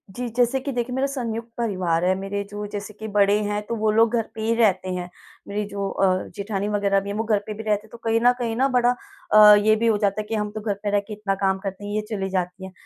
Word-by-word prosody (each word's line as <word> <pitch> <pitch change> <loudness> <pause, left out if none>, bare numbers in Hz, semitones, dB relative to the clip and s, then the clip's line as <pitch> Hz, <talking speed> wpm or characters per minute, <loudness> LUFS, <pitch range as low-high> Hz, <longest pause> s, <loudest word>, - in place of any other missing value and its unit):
जी 245 0 -3
जैसे 250 +2 +2
कि 280 +1 -4
देखिए 245 0 -2
मेरा 270 +1 +1
संयुक्त 235 -4 -4
परिवार 185 -7 0
है। 185 - +3
मेरे 195 +1 -3
जो 205 0 -5
जैसे 205 +1 -5
कि 220 - -5
बड़े 200 0 +4
हैं 205 0 -1
तो 235 - -2
वो 215 -1 +1
लोग 225 +2 +3
घर 225 -1 -1
पे 220 - -5
ही 225 +1 +1
रहते 190 -5 +2
हैं, 180 0 -5 0.4
मेरी 210 +1 -2
जो 200 -1 -3
अ, 195 - +1 0.3
जेठानी 200 0 -3
वग़ैरह 200 -1 +2
भी 200 +1 -7
है 200 - -3
वो 220 - -1
घर 215 -2 +2
पे 215 - -3
भी 220 +1 -7
रहते 210 0 0
हैं। - - -27
तो 235 - -10
कहीं 225 0 +2
न 245 - +7
कहीं 230 -2 -1
ना 265 +3 +2 0.7
अ, 210 -1 +10
ये 215 +1 +4
भी 230 +1 0
हो 215 -2 +3
जाता 205 0 0
है - - -9
कि 225 - -1
हम 210 -1 -2
तो 215 0 -6
घर 210 -2 -1
पे 205 - 0
रह 205 - +3
के 215 - -6
इतना 205 -2 -2
काम 190 0 +1
करते 195 +1 -5
हैं, 205 - -5
ये 215 - +1
चली 195 -3 -2
जाती 185 0 -3
है। 190 - -9
210 Hz, 285 wpm, -23 LUFS, 200-225 Hz, 0.7 s, अ